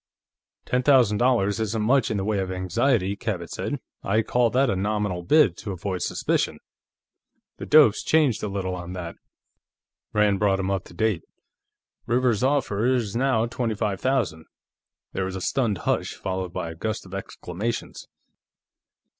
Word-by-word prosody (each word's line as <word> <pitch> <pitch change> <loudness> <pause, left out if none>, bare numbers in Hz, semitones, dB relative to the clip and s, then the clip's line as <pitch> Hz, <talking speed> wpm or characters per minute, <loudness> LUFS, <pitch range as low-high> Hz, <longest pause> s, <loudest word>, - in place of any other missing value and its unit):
"Ten 125 - +1
thousand 125 -7 +4
dollars 115 -5 +2
isn't 110 0 -1
much 125 +2 +3
in 110 - -1
the 95 - -1
way 105 0 0
of 95 -1 -2
anxiety," 95 +3 +1
Cabot 100 -6 -4
said. - - -3 0.2
"I'd 105 +2 +1
call 120 -1 +2
that 130 +4 +2
a 115 - +1
nominal 100 -2 -1
bid, 125 - +4
to 100 - -5
avoid 95 0 -4
suspicion." - - 0 1.0
"The - - -7
dope's 150 -8 +6
changed 150 -8 +2
a - - -2
little 95 -2 -3
on 90 0 -6
that." 85 -2 -6 0.9
Rand 105 -2 +2
brought 100 -2 +2
him 95 0 -1
up 95 -2 -2
to - - -14
date. 110 -4 +1 0.9
"Rivers's 120 -2 +2
offer 130 -7 +1
is 120 -6 0
now 125 -2 +2
twenty 120 -2 -2
five 100 -3 -2
thousand." 125 -12 0 0.7
There 95 - -1
was 95 0 -4
a - - -3
stunned 115 -2 0
hush, - - -1
followed 95 -1 -4
by 85 -1 -4
a - - -9
gust 110 +6 -3
of 95 - -13
exclamations. 100 +3 -5
105 Hz, 165 wpm, -25 LUFS, 95-120 Hz, 1.0 s, dope's